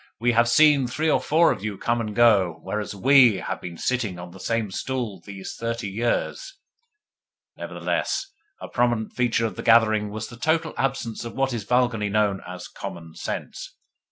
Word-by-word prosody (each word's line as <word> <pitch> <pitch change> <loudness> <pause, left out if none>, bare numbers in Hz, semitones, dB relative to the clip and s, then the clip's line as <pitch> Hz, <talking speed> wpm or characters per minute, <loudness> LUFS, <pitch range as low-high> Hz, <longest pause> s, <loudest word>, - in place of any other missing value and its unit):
We 120 +2 +2
have 120 0 +3
seen 145 0 +5
three 155 +6 0
or - - +2
four 165 +2 +4
of - - -4
you 105 -2 -3
come 120 +3 0
and 105 -2 -5
go, 100 -8 +4
whereas 105 +1 -4
WE 130 +1 +6
have - - -4
been 85 -2 -7
sitting 115 -6 -1
on 90 0 -9
the 95 - -13
same 115 -1 -1
stools 115 -6 -4
these 95 -2 -7
thirty 115 -2 -3
years." 120 - -2 1.0
Nevertheless - - -2 0.3
a - - -7
prominent 120 -3 0
feature 120 -2 +1
of 110 - -4
the - - -4
gathering 110 -2 +4
was 110 +1 -5
the 120 - -11
total 160 +4 0
absence 130 -4 -2
of 115 - -7
what 135 -1 0
is 110 -4 -4
vulgarly 120 -3 +1
known 100 -1 +1
as 90 0 -8
"common 80 -1 -8
sense." - - -6
115 Hz, 180 wpm, -24 LUFS, 100-125 Hz, 1.0 s, WE